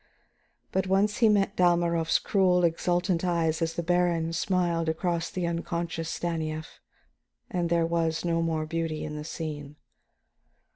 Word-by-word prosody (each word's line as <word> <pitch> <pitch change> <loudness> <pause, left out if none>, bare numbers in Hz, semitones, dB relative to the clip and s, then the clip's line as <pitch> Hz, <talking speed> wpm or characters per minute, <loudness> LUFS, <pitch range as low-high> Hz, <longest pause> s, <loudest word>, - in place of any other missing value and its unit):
But 190 0 0
once 200 +2 +2
he 225 - +5
met 200 -1 +2
Dalmorov's 170 -2 +3
cruel, 180 -3 +2
exultant 175 +1 +1
eyes 170 -2 +1
as 165 0 -1
the 170 - -2
baron 170 -1 +1
smiled 175 -2 0
across 170 +1 -1
the 180 -2 -3
unconscious 170 -1 -3
Stanief, 160 -2 -4 0.7
and 175 -2 -1
there 170 -1 +2
was 165 0 0
no 165 -1 +1
more 160 -2 -1
beauty 165 -1 -3
in 150 - -5
the 150 - -5
scene. 150 -3 -6
170 Hz, 140 wpm, -27 LUFS, 165-180 Hz, 0.7 s, he